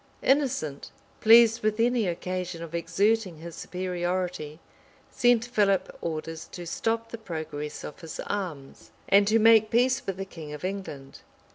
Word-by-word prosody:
Innocent, 255 - 0 0.3
pleased 230 0 +6
with 215 +1 0
any 235 -2 +2
occasion 180 0 -4
of 165 -1 -9
exerting 200 +2 +1
his 170 +2 -9
superiority, 180 -3 -3 0.5
sent 245 -1 +3
Philip 205 -5 +1
orders 160 0 -5
to 175 - -7
stop 225 +6 -2
the 230 - -6
progress 155 -6 -6
of 150 - -8
his 165 -2 -8
arms, 170 -9 -5 0.2
and 200 0 +5
to 220 +2 +4
make 225 -1 +6
peace 255 +3 +2
with 195 -1 -2
the 195 - -4
king 160 -5 -9
of 150 +4 -6
England. 185 -9 -6
185 Hz, 145 wpm, -27 LUFS, 165-225 Hz, 0.5 s, pleased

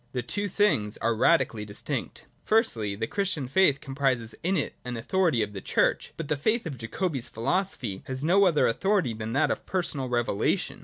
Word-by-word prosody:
The 125 -2 -2
two 205 - -2
things 185 - +1
are 115 +1 +1
radically 115 -3 +2
distinct. 100 -1 -5 0.2
Firstly, 120 - +1
the 115 +3 -2
Christian 185 - -1
faith 145 -1 +3
comprises 135 -5 -1
in 185 +3 +1
it - - -2
an 125 -1 -4
authority 155 -1 +1
of 105 0 -6
the 95 - -6
Church: - - +1
but 165 - -4
the 150 - +1
faith 220 - 0
of 140 -7 -6
Jacobi's 135 +3 -2
philosophy 120 - -1
has 130 +1 -2
no 190 +5 +5
other 165 -5 +3
authority 185 - +1
than 110 +1 -5
that 145 +4 +2
of - - -1
a - - -29
personal 150 -8 -2
revelation. 120 -4 0
135 Hz, 190 wpm, -27 LUFS, 115-185 Hz, 0.2 s, no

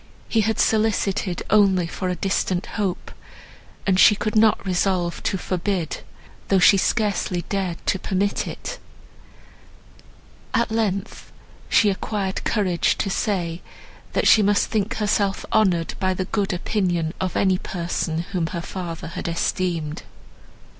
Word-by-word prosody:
He 225 - +2
had 220 +1 0
solicited 210 -4 +1
only 195 -4 +4
for 185 +3 -4
a 180 - -1
distant 185 0 -1
hope, 200 -5 -3 0.7
and 190 -1 +2
she 210 - +8
could 215 +1 -3
not 215 -2 +4
resolve 180 -2 0
to 195 - -1
forbid, 180 -2 -2 0.5
though 195 - +3
she 190 +2 +7
scarcely 195 -4 0
dared 190 -4 -1
to 190 - +1
permit 200 +2 -1
it; - - -6 1.8
at 235 -1 +1
length, 205 -4 -2 0.4
she 210 -2 +4
acquired 195 0 -3
courage 190 -6 +1
to 195 - -1
say, 180 -4 -1 0.5
that - - +2
she 220 - +7
must 205 0 +2
think 220 +2 0
herself 205 -2 0
honoured 180 -6 +2
by 185 -1 +1
the 185 - -2
good 200 0 -1
opinion 175 -3 -1
of 185 -1 -1
any 190 -2 +2
person, 170 -2 -2
whom 175 -4 0
her 170 0 -4
father 170 -3 -6
had - - -5
esteemed. 170 -2 -1
190 Hz, 135 wpm, -23 LUFS, 175-205 Hz, 1.8 s, she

